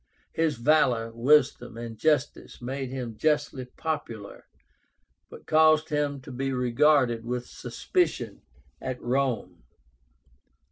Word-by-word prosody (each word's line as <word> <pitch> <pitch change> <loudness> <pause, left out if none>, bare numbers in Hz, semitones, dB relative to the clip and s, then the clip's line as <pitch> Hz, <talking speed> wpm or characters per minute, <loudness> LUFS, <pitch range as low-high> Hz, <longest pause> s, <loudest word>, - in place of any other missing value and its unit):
His 160 -2 +1
valor, 120 -3 +2
wisdom, 125 -1 +2
and 115 -1 -6
justice 150 +3 0
made 130 +1 -4
him 125 -4 -5
justly 145 -1 0
popular, 125 -7 -6 0.8
but - - -13
caused 155 0 +4
him 145 -2 -1
to 130 - -10
be 135 +2 -2
regarded 125 -1 +3
with 125 +1 -3
suspicion 360 -2 -2 0.4
at 130 -1 -4
Rome. 130 - -1
130 Hz, 105 wpm, -27 LUFS, 120-150 Hz, 0.8 s, caused